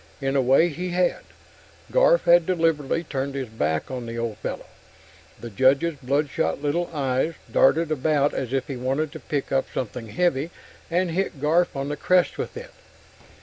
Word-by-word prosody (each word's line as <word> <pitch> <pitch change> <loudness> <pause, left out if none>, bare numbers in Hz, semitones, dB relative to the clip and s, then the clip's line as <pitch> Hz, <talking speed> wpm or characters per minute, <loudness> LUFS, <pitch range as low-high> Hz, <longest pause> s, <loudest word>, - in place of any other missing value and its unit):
In 135 0 -1
a 135 - +4
way, 135 +7 +4
he 180 +4 -4
had; 180 0 +1 0.7
Garf - - +5
had 170 -1 +5
deliberately 165 -3 +1
turned 140 -2 -4
his 130 -4 -4
back 80 - -2
on 125 -2 -5
the 115 0 -5
old 115 -2 -3
fellow. - - -5 0.7
The 120 - -8
Judge's 135 +9 +3
bloodshot 140 - 0
little 150 +4 -1
eyes 140 +1 -1 0.2
darted 155 +4 +3
about 145 0 +1
as 130 -3 -3
if 135 -1 0
he 135 - -5
wanted 135 +5 -1
to 160 - -8
pick 145 -2 -3
up 135 0 +1
something 120 -1 -4
heavy 165 +2 0 0.4
and 175 +1 +1
hit 175 -4 -2
Garf 160 +4 +2
on 135 +1 -3
the 150 - -3
crest 180 +3 +2
with - - -4
it. - - -9
145 Hz, 175 wpm, -24 LUFS, 130-165 Hz, 0.7 s, Garf